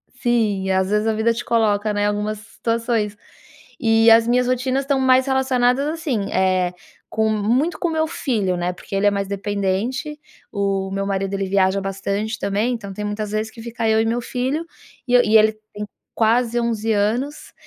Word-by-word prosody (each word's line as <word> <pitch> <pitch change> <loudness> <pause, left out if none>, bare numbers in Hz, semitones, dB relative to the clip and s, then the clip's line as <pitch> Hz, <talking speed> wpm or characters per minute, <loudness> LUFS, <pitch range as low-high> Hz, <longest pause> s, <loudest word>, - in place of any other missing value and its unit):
sim. 215 -6 0
Às 190 0 +1
vezes 210 +1 +1
a 220 - +2
vida 220 +2 +2
te 235 - -5
coloca, 215 -2 +1
né, 205 0 +1
algumas 210 +1 -2
situações. 225 -1 -2 0.6
E 225 -1 +4
as 225 +1 +6
minhas 250 +1 +2
rotinas 255 +2 0
estão 275 -1 0
mais 260 0 +4
relacionadas, 260 0 +2
assim, 295 -11 -2
eh, 185 -1 +1 0.4
com 220 0 +1
muito 235 +10 +1
com 345 - 0
meu 320 -1 0
filho, 210 - -1
né, 175 +1 -1
porque 190 +2 -8
ele 200 +1 +1
é 205 - +4
mais 200 -1 -2
dependente. 205 - -2 0.3
O 195 -2 -1
meu 195 0 -2
marido 195 0 -2
ele 195 0 -1
viaja 195 0 +2
bastante 200 +3 -3
também. 205 +5 0
Então 200 -5 -6
tem 210 - -5
muitas 210 0 -3
vezes 215 +1 -2
que 225 - -12
fica 230 -1 -3
eu 220 0 +3
e 225 - 0
meu 235 +2 0
filho 265 +8 -2 0.4
e 245 - -1
eu 245 - +7
e 220 +1 +5
ele 220 0 +4 0.2
tem 210 0 -5 0.3
quase 235 +1 +2
11 225 -1 0
anos 235 +9 -1
220 Hz, 185 wpm, -21 LUFS, 200-245 Hz, 0.6 s, eu